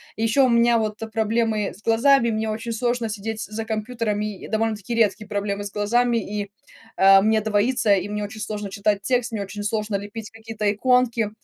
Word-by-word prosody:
И 220 Hz, -, -3 dB
ещё 245 Hz, +5 st, +4 dB
у -, -, +2 dB
меня 235 Hz, 0 st, +4 dB
вот 215 Hz, -1 st, -2 dB, 0.2 s
проблемы 220 Hz, -1 st, 0 dB
с 205 Hz, -, -19 dB
глазами, 235 Hz, +1 st, +4 dB
мне 220 Hz, 0 st, -1 dB
очень 225 Hz, +2 st, -4 dB
сложно 240 Hz, 0 st, -1 dB
сидеть 220 Hz, +1 st, -4 dB
за 220 Hz, +1 st, -5 dB
компьютерами. 215 Hz, -1 st, -2 dB
И -, -, -10 dB
довольно-таки 220 Hz, 0 st, -2 dB
редкие 215 Hz, -2 st, +1 dB
проблемы 205 Hz, -1 st, -2 dB
с 200 Hz, -, -6 dB
глазами 235 Hz, +4 st, +1 dB
и, 205 Hz, -2 st, -4 dB, 0.5 s
э, 195 Hz, 0 st, +7 dB
мне 220 Hz, +2 st, +3 dB
двоится, 215 Hz, +1 st, +2 dB
и 195 Hz, +1 st, -3 dB
мне 210 Hz, 0 st, -3 dB
очень 215 Hz, +1 st, -7 dB
сложно 210 Hz, -2 st, -5 dB
читать 200 Hz, 0 st, 0 dB
текст, 245 Hz, +1 st, 0 dB
мне 210 Hz, -3 st, -3 dB
очень 205 Hz, +1 st, -7 dB
сложно 210 Hz, 0 st, -2 dB
лепить 205 Hz, +2 st, -8 dB
какие-то 225 Hz, -1 st, -6 dB
иконки. 240 Hz, -1 st, +2 dB
220 Hz, 190 wpm, -23 LUFS, 205-230 Hz, 0.5 s, э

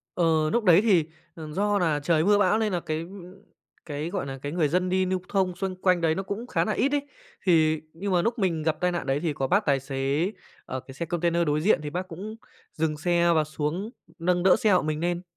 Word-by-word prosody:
Ờ, 160 Hz, -3 st, +2 dB
núc 235 Hz, -2 st, +1 dB
đấy 175 Hz, -1 st, +7 dB
thì, 190 Hz, -8 st, +4 dB, 0.3 s
ờ, 160 Hz, -2 st, -8 dB
do 205 Hz, +4 st, +1 dB
là 160 Hz, -5 st, +1 dB
trời 160 Hz, +1 st, +2 dB
mưa 205 Hz, +2 st, +4 dB
bão 205 Hz, +1 st, +3 dB
nên 215 Hz, -2 st, 0 dB
là 175 Hz, -, 0 dB
cái, 155 Hz, -1 st, -3 dB
ưm, 180 Hz, +1 st, -10 dB, 0.5 s
cái, 150 Hz, +2 st, -4 dB
gọi 185 Hz, -5 st, -3 dB
nà, 135 Hz, -1 st, -6 dB
cái 145 Hz, -, -4 dB
người 165 Hz, -3 st, +1 dB
dân 180 Hz, +4 st, 0 dB
đi 185 Hz, 0 st, +1 dB
lưu 185 Hz, 0 st, 0 dB
thông 190 Hz, -3 st, 0 dB
xung 190 Hz, -1 st, -3 dB
quanh 180 Hz, -2 st, +3 dB
đấy 160 Hz, -1 st, +2 dB
nó 195 Hz, -, -3 dB
cũng 200 Hz, +5 st, -5 dB
khá -, -, 0 dB
nà 215 Hz, -, -1 dB
ít 275 Hz, +6 st, +1 dB
ấy. 285 Hz, -1 st, 0 dB, 0.4 s
Thì 160 Hz, -3 st, +3 dB
nhưng 195 Hz, +4 st, -4 dB
mà 175 Hz, -1 st, +3 dB
lúc 230 Hz, +4 st, -1 dB
mình 175 Hz, -6 st, 0 dB
gặp 155 Hz, 0 st, 0 dB
tai 180 Hz, 0 st, +1 dB
nạn 175 Hz, -, -3 dB
đấy 135 Hz, +1 st, 0 dB
thì 165 Hz, -2 st, -1 dB
có 135 Hz, -1 st, -2 dB
bác 200 Hz, +8 st, +2 dB
tài 140 Hz, -2 st, +2 dB
xế, 135 Hz, +7 st, -1 dB, 0.3 s
ờ, 130 Hz, -, -5 dB
cái 135 Hz, -, -13 dB
xe 170 Hz, +5 st, -4 dB
container 170 Hz, 0 st, 0 dB
đối 150 Hz, 0 st, +1 dB
diện 190 Hz, +2 st, +3 dB
thì 150 Hz, -, -5 dB
bác 180 Hz, +4 st, -4 dB
cũng 200 Hz, +6 st, -7 dB, 0.4 s
dừng 155 Hz, -1 st, -1 dB
xe 170 Hz, +2 st, +2 dB
và 155 Hz, -1 st, +3 dB
xuống, 155 Hz, +7 st, -3 dB, 0.3 s
nâng 175 Hz, +1 st, +1 dB
đỡ 185 Hz, 0 st, +6 dB
xe 215 Hz, -, +2 dB
hộ 180 Hz, -, +4 dB
mình 155 Hz, 0 st, -2 dB
nên. 175 Hz, +1 st, -1 dB
175 Hz, 255 wpm, -26 LUFS, 155-190 Hz, 0.5 s, đấy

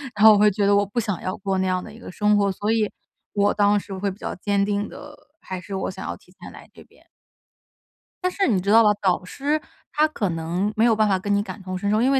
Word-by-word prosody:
然 210 Hz, +1 st, +4 dB
后 220 Hz, -, +10 dB
我 -, -, +4 dB
会 210 Hz, +1 st, +5 dB
觉 200 Hz, +1 st, 0 dB
得 200 Hz, 0 st, +4 dB
我 200 Hz, 0 st, +3 dB
不 205 Hz, +4 st, -3 dB
想 205 Hz, -6 st, -3 dB
要 185 Hz, -, -3 dB
过 195 Hz, -1 st, -2 dB
那 190 Hz, 0 st, 0 dB
样 185 Hz, 0 st, -1 dB
的 220 Hz, -, -11 dB
一 225 Hz, -, -13 dB
个 -, -, -9 dB
生 210 Hz, +2 st, +2 dB
活。 200 Hz, -1 st, +2 dB
所 205 Hz, +3 st, -2 dB
以， 220 Hz, -2 st, +1 dB, 0.4 s
我 205 Hz, 0 st, +2 dB
当 205 Hz, 0 st, +3 dB
时 200 Hz, -, -9 dB
会 195 Hz, +1 st, -2 dB
比 190 Hz, -, -12 dB
较 -, -, -5 dB
坚 200 Hz, +2 st, 0 dB
定 205 Hz, 0 st, -1 dB
地 295 Hz, +1 st, -11 dB, 0.3 s
还 185 Hz, -1 st, -6 dB
是 195 Hz, +2 st, -7 dB
我 190 Hz, -, -2 dB
想 -, -, -8 dB
要 -, -, -4 dB
提 -, -, -24 dB
前 -, -, -12 dB
来 -, -, -14 dB
这 -, -, -14 dB
边。 -, -, -26 dB, 1.2 s
但 365 Hz, -, +1 dB
是 390 Hz, +1 st, 0 dB
你 210 Hz, -6 st, +2 dB
知 190 Hz, +2 st, -3 dB
道 225 Hz, +2 st, +7 dB
吧， 210 Hz, -1 st, +5 dB
导 185 Hz, -2 st, +1 dB
师， 290 Hz, +11 st, -2 dB, 0.3 s
他 305 Hz, +1 st, +3 dB
可 205 Hz, -10 st, -2 dB
能 170 Hz, +5 st, -2 dB
没 225 Hz, +1 st, +3 dB
有 230 Hz, -2 st, +4 dB
办 215 Hz, 0 st, +3 dB
法 195 Hz, -2 st, +2 dB
跟 205 Hz, +2 st, -2 dB
你 200 Hz, -, +2 dB
感 210 Hz, 0 st, -8 dB
同 185 Hz, 0 st, -5 dB
身 200 Hz, +2 st, -2 dB
受。 215 Hz, +2 st, +2 dB
因 260 Hz, +3 st, +3 dB
为 270 Hz, -, +3 dB
205 Hz, 305 characters per minute, -23 LUFS, 190-220 Hz, 1.2 s, 后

